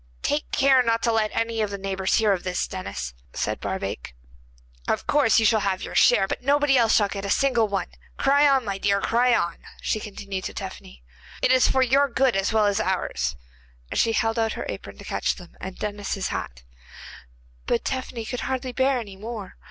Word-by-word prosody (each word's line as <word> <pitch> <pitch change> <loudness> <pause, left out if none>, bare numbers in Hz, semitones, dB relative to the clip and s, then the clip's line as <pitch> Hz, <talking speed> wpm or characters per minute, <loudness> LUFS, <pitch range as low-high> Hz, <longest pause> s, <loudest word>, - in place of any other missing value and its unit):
'Take 295 +1 -1
care 270 -1 +5
not 230 -1 0
to 235 - +3
let 220 -1 +1
any 230 -1 -1
of 210 - 0
the 200 - -4
neighbours 190 -1 -1
hear 215 -3 +3
of 185 -1 -4
it, 180 - -1
Denis,' 65 - -5 0.2
said - - -2
Barbaik. - - -4 0.7
'Of - - 0
course 285 -6 +3
you 225 - +4
shall 220 0 +4
have 195 -2 -1
your - - -6
share, 195 -5 +5
but - - -4
nobody 285 +1 +3
else 230 -3 +4
shall 205 - +4
get 200 0 -6
a 200 - -3
single 240 -1 +2
one. 195 -3 -1 0.3
Cry 285 +2 +4
on, 270 -3 +2
my 195 -1 -3
dear, 200 0 +2
cry 240 +4 +3
on,' 170 -5 -1 0.2
she 215 - -1
continued 195 -2 -6
to - - -5
Tephany. - - -8 0.4
It - - +4
is 255 -1 +5
for 265 - +3
your 275 +3 +3
good 260 -1 +2
as 195 +2 +1
well 220 -1 +3
as 205 0 +1
ours,' 180 - -1 0.6
and - - 0
she 225 - +3
held 225 +1 +1
out 225 -1 +1
her - - -5
apron - - -7
to - - -11
catch - - -1
them, 175 -2 -14
and 190 0 -7
Denis 205 -1 -3
his 195 -1 -3
hat. - - -5 1.0
But 235 - 0
Tephany 255 -3 -3
could 245 +3 -4
hardly 260 0 -3
bear 265 +1 +2
any 205 -5 -7
more. 215 -2 -7
220 Hz, 210 wpm, -24 LUFS, 195-250 Hz, 1.0 s, care